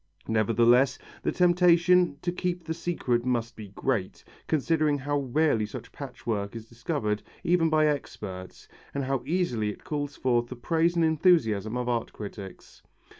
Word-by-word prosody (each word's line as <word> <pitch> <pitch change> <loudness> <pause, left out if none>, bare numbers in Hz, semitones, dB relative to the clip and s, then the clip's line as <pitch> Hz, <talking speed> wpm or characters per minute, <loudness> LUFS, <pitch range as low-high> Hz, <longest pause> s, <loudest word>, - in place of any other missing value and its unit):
Nevertheless 115 +4 +3 0.2
the - - 0
temptation 180 -2 +4
to 175 - 0
keep 180 0 -3
the 160 0 -3
secret 160 -8 -1
must 120 -2 -1
be 105 -2 -9
great, 100 0 -2 0.2
considering 155 -1 +1
how 145 +1 -1
rarely 135 -4 +1
such 120 +1 -9
patchwork 115 -7 -4
is 115 -1 -8
discovered 115 -3 -2 0.2
even 170 -1 +3
by 155 -1 +3
experts, 100 -10 -4 0.3
and 140 - -1
how 135 0 -1
easily 145 -11 0
it 105 - -8
calls 145 -1 -3
forth 120 -2 +1
the 125 - -7
praise 165 +7 +1
and 170 -1 +3
enthusiasm 125 - +2
of 125 0 -2
art 120 -2 -1
critics. 100 -2 -9
130 Hz, 150 wpm, -27 LUFS, 115-160 Hz, 0.3 s, temptation